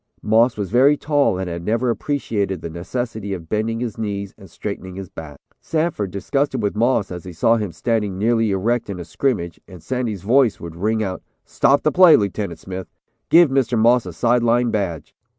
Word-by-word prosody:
Moss 115 +2 +3
was 100 -3 -4
very 135 +5 +5
tall 145 -10 +1
and 95 0 -3
had 85 -1 -5
never 115 +5 +1
appreciated 110 - -2
the 85 - -6
necessity 100 +3 -4
of 85 -3 -10
bending 110 +4 -1
his 120 -2 -4
knees 100 -2 -4
and 95 -4 -15
straightening 95 +1 -6
his 95 -2 -7
back. 75 -3 -10 0.2
Sanford 155 - -1
disgusted 135 +8 -1
with 105 -2 -1
Moss 115 -3 +1
as 90 -2 -6
he 90 - -9
saw 115 +8 +3
him 105 -5 -3
standing 105 +2 -1
nearly 115 +1 +2
erect 105 +4 0
in 95 -3 -5
a 85 - -6
scrimmage, 85 - -2
and 90 -4 -13
Sandy's 120 -7 -3
voice 125 +1 +3
would 85 -1 -8
ring 110 +5 0
out, 95 -2 -4 0.2
"Stop 140 +1 +2
the 155 - +2
play, 175 +2 +7
Lieutenant 100 -3 -2
Smith. 95 +2 -7 0.4
Give 170 -4 +6
Mr. 130 -3 +1
Moss 115 -1 +4
a - - -5
side 120 +8 +2
line 120 0 +2
badge. 90 -8 -3
110 Hz, 195 wpm, -21 LUFS, 95-120 Hz, 0.4 s, play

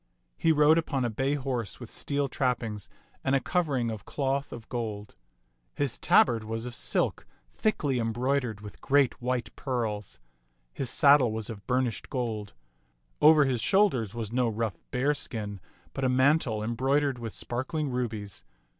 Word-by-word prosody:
He 165 - +2
rode 155 +1 +5
upon 140 -6 -1
a 120 - -1
bay 135 +6 0
horse 130 -7 -3
with - - -9
steel 140 -1 -1
trappings 120 -6 -2 0.3
and 135 - +2
a - - +4
covering 135 -7 0
of 110 -3 -6
cloth 140 0 -2
of 115 -2 -9
gold. 110 -4 -4 0.6
His 140 -4 -1
tabard 115 -3 +4
was 115 +1 -4
of 125 - -6
silk, - - 0 0.3
thickly 145 - 0
embroidered 120 -1 -1
with 105 -1 -11
great 140 -2 +2
white 125 0 -2
pearls. 115 -7 -3 0.5
His 130 - -2
sad 145 0 +7
dle 125 -6 +1
was 110 +1 -4
of 100 -3 -10
burnished 125 -3 -1
gold. 110 - -3 0.7
Over 155 -1 +7
his 125 -4 0
shoulders 130 - +2
was 115 -3 -4
no 125 -1 +1
rough 110 -5 -3
bearskin, 125 -7 -2 0.3
but 135 - -4
a 130 - +3
mantle 130 -4 +2
embroidered 135 +4 +1
with 115 -2 -5
spar 120 +1 -3
kling 150 0 -3
rubies. 110 - -4
125 Hz, 155 wpm, -28 LUFS, 110-140 Hz, 0.7 s, sad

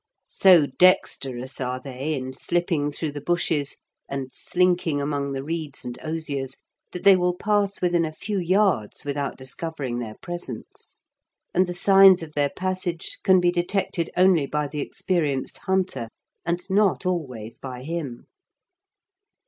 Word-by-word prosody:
So 180 -6 +5
dexterous 135 -5 +2
are 125 0 -2
they 135 +3 -4
in 130 -1 -5
slipping 165 -1 0
through 155 +1 -3
the 145 0 -7
bushes, 160 -3 0 0.3
and 135 -1 -4
slinking 175 -4 +1
among 140 -1 -2
the 135 0 -4
reeds 155 -3 -4
and 125 0 -6
osiers, 145 -4 -3 0.3
that 180 - -7
they 200 -1 +8
will 180 -1 +1
pass 205 -1 0
within 175 -1 +3
a 160 - -2
few 200 +5 -3
yards 185 - +1
without 140 -1 -3
discovering 130 -1 -4
their 110 -3 -6
presence, 175 -10 -8 0.5
and 185 +1 +3
the 175 - -4
signs 195 -1 +7
of 155 -2 -10
their 145 -1 +1
passage 185 0 -2
can 190 -2 +6
be 175 0 +3
detected 175 -1 -1
only 180 -6 +4
by 150 +1 -1
the 145 +1 -4
experienced 150 -6 -1
hunter, 190 -10 0 0.4
and 175 +1 -2
not 200 -1 +2
always 130 -12 -3
by 125 -2 -7
him. 150 -6 -5
160 Hz, 145 wpm, -24 LUFS, 135-180 Hz, 0.5 s, they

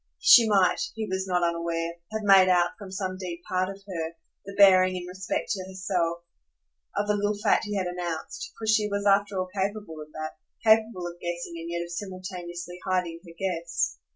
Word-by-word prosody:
She 235 -10 +8
might, 195 -3 +4 0.2
he 220 -1 -2
was 190 -1 -2
not 180 -1 +1
unaware, 170 0 -2
have 220 0 -3
made 195 -2 +7
out, 175 -1 +4
from 200 -2 -8
some 190 -1 -3
deep 175 -2 -6
part 185 0 0
of 195 0 -9
her, 165 -3 -4 0.3
the 200 0 -8
bearing, 185 -2 +7
in 175 - -5
respect 185 +1 -3
to 190 -3 -2
herself, 185 -3 -2 0.7
of 205 - +1
the 210 - +3
little 205 0 0
fact 205 - +2
he 210 0 -3
had 190 -2 0
announced; 180 - -4
for 225 - -6
she 215 -1 +3
was 200 0 -2
after 200 0 +3
all 185 0 -2
capable 200 -5 -3
of 150 0 -11
that, 155 0 -6 0.2
capable 220 -4 +3
of 175 0 -7
guessing 175 0 -4
and 165 +1 -6
yet 170 0 -2
of 170 - -9
simultaneously 180 -2 -6
hiding 180 -3 -1
her 170 -3 -13
guess. 170 - -1
185 Hz, 195 wpm, -27 LUFS, 175-200 Hz, 0.7 s, She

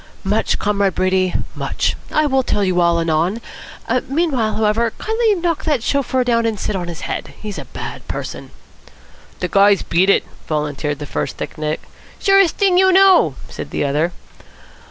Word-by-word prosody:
"Much, 210 +3 +1
Comrade 200 -2 0
Brady, 185 -1 +1 0.2
much. - - -1 0.2
I 305 - +2
will 265 -2 +2
tell 210 -5 0
you 185 -2 +2
all 170 -1 +3
anon. 165 +6 0 0.7
Meanwhile, 270 -6 0
however, 220 +1 +1
kindly 445 -1 +1
knock 340 -3 -1
that 290 -8 +1
chauffeur 260 -2 +1
down 230 -2 +1
and 220 -3 -2
sit 205 - -2
on 180 -2 -3
his 170 -2 -6
head. - - -5
He's 210 -2 -6
a - - -8
bad - - -8
person." - - -6 0.9
"De 180 - 0
guy's 200 +2 +4
beat 180 +4 +2
it," - - +4 0.2
volunteered 150 -1 -2
the 145 - -6
first - - -3
thick - - -6
neck. 155 -1 -3 0.4
"Surest 390 -3 +4
thing 380 -3 +3
you 380 0 +5
know," 385 0 +5
said - - -7
the - - -1
other. 150 +5 0
210 Hz, 170 wpm, -19 LUFS, 175-290 Hz, 0.9 s, you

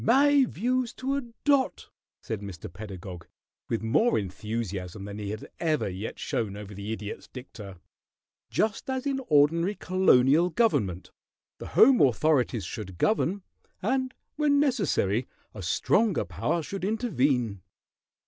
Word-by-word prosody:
"My 275 +3 +5
views 250 +3 -1
to 270 +2 -2
a 280 - 0 0.2
dot," 280 -3 +1 0.3
said 110 -3 -4
Mr. 95 -4 -8
Pedagog, 90 -3 -8 0.4
with 115 - -1
more 155 - +3
enthusiasm 100 -1 -4
than 100 +1 -7
he 105 -1 -4
had 110 +1 -6
ever 155 -7 +1
yet 95 +3 -5
shown 105 -3 -2
over 105 0 -8
the 100 +2 -6
Idiot's 105 -2 -6
dicta. 105 -7 -10 0.7
"Just 215 +4 -1
as 260 0 -2
in 275 -1 -1
ordinary 165 +6 +3
colonial 170 -4 +4
government, 140 - 0 0.5
the - - -7
home 255 +1 +7
authorities 125 - +2
should 95 -2 -7
govern, 200 - +1 0.4
and 260 -1 0 0.2
when 290 -2 +3
necessary 180 - +1 0.3
a 105 - -8
stronger 190 - +1
power 125 - -1
should 195 +4 -6
intervene." 135 - 0
135 Hz, 130 wpm, -27 LUFS, -, 0.7 s, home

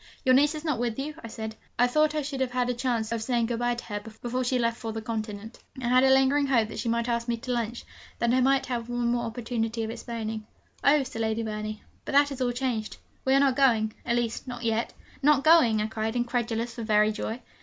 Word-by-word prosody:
'Your 255 - +6
niece 290 +4 +4
is 305 +1 -7
not 295 -7 0
with 235 -2 -1
you?' 290 +3 -3
I - - -5
said; 220 0 -6 0.2
'I 245 - +5
thought 305 +4 +2
I 305 - 0
should 275 -1 -4
have 260 - +1
had 250 0 0
a - - -1
chance 240 -3 -1
of 230 - 0
of - - -6
saying 235 0 +1
good 230 0 -2
bye 240 0 +1
to 240 - -7
her 205 -1 -4
before 235 +4 -4
she 255 +1 +1
left 230 -1 0
for 225 - -5
the 225 - -4
continent.' 220 0 -5 0.2
I 240 -2 -2
had 255 +1 +5
a 265 - +5
lingering 270 +2 +4
hope 230 -5 +2
that - - -6
she 230 +2 -1
might 235 +1 0
ask 235 0 -1
me 235 -1 0
to 250 +2 -5
lunch, 235 -1 -2 0.3
that 235 0 +1
I 255 - +4
might 270 +1 +3
have 240 -2 -3
one 240 -1 0
more 240 0 0
opportunity 230 0 -2
of 220 - -3
explaining. 225 -2 -5 0.4
'Oh,' 285 0 +5
said 225 -3 -6
Lady 220 0 0
Verney, 215 0 -5 0.2
'but - - -5
that 285 +1 +5
is 270 -1 -5
all 245 -1 +2
changed; 240 -3 -2 0.3
we 265 0 +4
are - - +5
not 275 -2 +3
going 230 -6 +3
at 235 - 0
least, 240 +1 -2
not 245 -1 -6
yet.' 225 0 0 0.3
'Not 285 -1 +4
going!' 310 -9 +6
I - - 0
cried, 220 +1 -3
incredulous 240 -1 -1
for 235 - -7
very 215 -1 +3
joy. 220 +2 -4
240 Hz, 255 wpm, -27 LUFS, 225-260 Hz, 0.4 s, Your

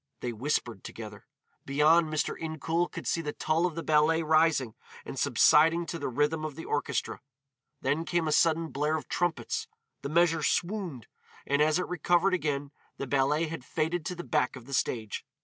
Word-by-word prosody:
They 120 -1 -3
whispered 120 -4 -2
together. 110 0 -9 0.4
Beyond, 155 +4 +4
Mr. 155 -1 -1
Incoul 165 +2 -2
could - - -7
see 165 - 0
the 150 -2 -4
tulle 160 +3 +1
of 170 - -7
the 165 - -4
ballet 155 +2 +3
rising 155 -6 +3 0.3
and - - -6
subsiding 165 +3 +4
to 170 - -5
the 145 - -3
rhythm 150 +5 0
of 155 -3 -4
the 160 - -8
orchestra. 145 -3 -2 0.6
Then 145 +5 0
came 170 -2 0
a - - 0
sudden 165 +1 +3
blare 150 +2 0
of 145 - -8
trumpets, 175 -3 -1 0.3
the 140 - -4
measure 165 0 +3
swooned, 170 - -1 0.4
and 140 +1 +1
as 155 +1 +4
it 180 - -1
recovered 180 +2 +2
again 145 -5 -1 0.3
the - - -4
ballet 140 +4 +1
had 160 -4 -6
faded 160 +6 -2
to 180 - -3
the 175 - -6
back 150 -7 0
of 125 -3 -11
the 140 - -9
stage. 110 -5 -1
155 Hz, 185 wpm, -29 LUFS, 140-165 Hz, 0.6 s, Beyond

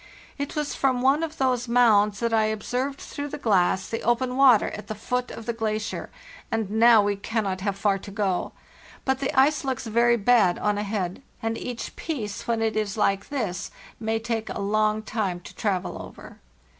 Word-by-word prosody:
It 285 - -4
was 300 -1 -1
from 255 -2 +1
one 275 +4 +4
of 320 -1 -4
these 255 -2 +1
mounds 215 -4 +4
that 230 -1 0
I 220 -1 +4
observed 250 +6 -2
through 290 0 -6
the 290 - -6
glass 190 -7 +2
the 225 - -3
open 250 +2 +1
water 260 -5 +5
at 210 - -8
the 215 - -4
foot 250 +4 -2
of 230 - -8
the 235 - -1
glacier, 220 0 -3 0.4
and 225 -3 -2
now 225 0 +6
we 205 0 +1
cannot 200 -2 -2
have 200 -1 -1
far 195 -1 +1
to 200 - -10
go. 195 -3 -1 0.5
But 265 -1 +1
the 270 - -1
ice 285 +1 +4
looks 265 -3 -2
very 235 +2 +3
bad 210 -5 +4
on 210 -1 0
ahead, 200 -2 -3 0.2
and 225 0 0
each 245 0 -6
piece 220 - -5
when 230 -1 +1
it 220 -1 0
is 215 -1 -1
like 195 -2 +1
this 205 -9 -3 0.3
may 220 0 0
take 225 -1 -3
a - - -4
long 215 +1 +1
time 205 -5 -2
to - - -12
travel 195 -4 -2
over. - - -12
225 Hz, 195 wpm, -25 LUFS, 205-245 Hz, 0.5 s, now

